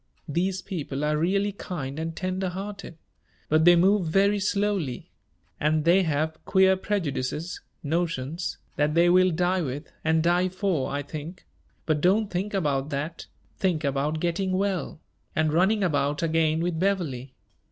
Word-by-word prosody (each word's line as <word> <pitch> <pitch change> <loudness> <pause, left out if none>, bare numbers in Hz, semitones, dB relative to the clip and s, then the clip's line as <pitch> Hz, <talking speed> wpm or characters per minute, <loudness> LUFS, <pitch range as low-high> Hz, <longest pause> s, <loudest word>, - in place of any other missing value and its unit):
These 185 +5 -1
people 145 -6 -4
are 150 0 +1
really 195 +6 +1
kind 155 -8 -6
and 165 0 -4
tender 185 0 -2
hearted; 195 -2 -7 0.5
but 155 +1 +4
they 175 0 +8
move 190 +1 +3
very 200 +5 +3
slowly 200 -9 -1 0.5
and 155 +1 +1
they 175 +3 +5
have 160 -1 -1
queer 190 -1 +4
prejudices 170 -5 -3 0.2
notions 165 0 -2 0.2
that 150 +1 +1
they 170 +1 +5
will 185 +1 +5
die 180 +2 +1
with, 145 0 -5
and 160 0 +2
die 175 +2 +2
for, 185 -6 -1
I 145 +1 -2
think; 155 +5 -8 0.4
but 155 -2 +1
don't 200 +4 +2
think 195 +3 -2
about 145 -6 0
that 150 +4 -4 0.3
think 175 -5 +1
about 140 +2 0
getting 185 +3 -1
well, 190 -4 -1 0.4
and 155 -1 +1
running 195 +5 +3
about 145 -3 0
again 160 -1 +2
with 170 -2 -1
Beverley. 155 -10 -1
170 Hz, 150 wpm, -26 LUFS, 150-190 Hz, 0.5 s, they